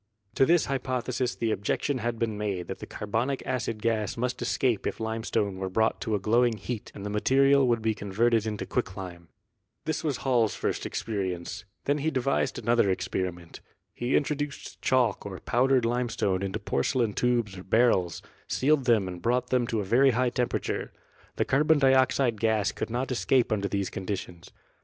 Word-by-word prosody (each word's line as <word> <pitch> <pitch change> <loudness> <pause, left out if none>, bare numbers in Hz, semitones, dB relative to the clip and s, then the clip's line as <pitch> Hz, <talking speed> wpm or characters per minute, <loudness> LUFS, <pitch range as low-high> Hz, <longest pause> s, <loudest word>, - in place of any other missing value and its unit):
To 135 - +3
this 170 -1 +4
hypothesis 130 -2 -2
the 115 -1 -1
objection 110 +7 -1
had 115 0 -2
been 110 -2 -1
made 100 -4 -2
that - - -5
the - - -8
carbonic 115 +6 -2
acid 115 -4 -2
gas 110 -2 0
must 125 +1 -2
escape 120 -6 0
if - - -4
limestone 110 -3 -1
were 95 0 -2
brought 110 +4 +1
to 110 - 0
a - - 0
glowing 115 +3 +2
heat 105 +2 -5
and 100 - -7
the 105 - -3
material 135 +5 +4
would 115 -2 +1
be 110 0 +2
con 100 -2 -7
verted 115 +1 +2
into 105 -3 -3
quicklime. 90 -3 -4 0.6
This 155 +1 -2
was 150 -5 0
Hall's 120 -5 +2
first - - -2
experience; 95 -4 -4 0.2
then 145 +1 +1
he 155 +3 +1
devised 135 -2 0
another 115 -3 +2
experiment. 90 -2 -3 0.3
He 120 +2 -1
introduced 145 0 -2
chalk 130 -2 +2
or 95 -2 -7
powdered 130 0 +2
limestone 115 -5 0
into 100 -1 -2
porcelain 115 - 0
tubes 120 -5 0
or 90 - -9
barrels, 95 -5 +2 0.2
sealed 140 0 +2
them 110 -6 +3
and 90 -1 -7
brought 125 +4 0
them 125 -2 +2
to 110 -2 -1
a - - -4
very 130 +7 +5
high 125 -1 +2
temperature. 125 -1 -2 0.4
The - - 0
carbon 150 +3 +3
dioxide 130 -4 +3
gas 110 -3 +2
could - - -4
not 125 +3 -2
escape 125 0 +2
under 100 -2 0
these 100 -1 -2
con 95 -1 -6
ditions. 90 -4 -5
115 Hz, 180 wpm, -27 LUFS, 100-130 Hz, 0.6 s, very